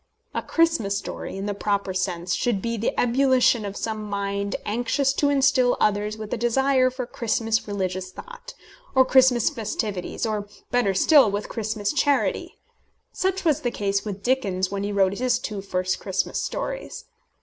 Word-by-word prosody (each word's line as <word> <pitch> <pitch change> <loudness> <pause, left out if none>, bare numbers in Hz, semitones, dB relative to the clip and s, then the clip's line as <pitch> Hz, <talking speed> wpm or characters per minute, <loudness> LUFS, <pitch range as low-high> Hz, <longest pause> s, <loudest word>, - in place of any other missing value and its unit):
A - - -1
Christmas 330 -13 +1
story, 195 - -6
in 195 - -4
the 205 - -1
proper 200 -1 -1
sense, 180 -1 -2
should 235 -5 0
be 230 +4 -2
the 225 0 -1
ebullition 250 -2 +3
of 200 0 -5
some 220 -1 -3
mind 200 -1 -3
anxious 255 +5 0
to 285 0 +1
instil 270 -3 +3
others 210 +1 +1
with 215 -1 -6
a - - -1
desire 255 +3 +2
for 255 0 -5
Christmas 225 -2 -1
religious 185 -2 -3
thought, - - -11 0.4
or 260 0 +6
Christmas 255 -3 +4
festivities, 210 -3 -3
or, 210 -2 -2 0.2
better 240 -6 +2
still, 280 - +6
with 205 +1 -3
Christmas 215 -1 -2
charity. 290 -2 +1 0.6
Such 380 0 -1
was 310 -2 +2
the 245 - 0
case 200 -3 -1
with 200 -2 -6
Dickens 195 -8 0
when 200 -1 -2
he 205 - -2
wrote 195 0 +1
his 250 0 +2
two 210 -2 -5
first 185 -1 -2
Christmas 190 -2 -2
stories. - - -5
220 Hz, 165 wpm, -24 LUFS, 200-260 Hz, 0.6 s, or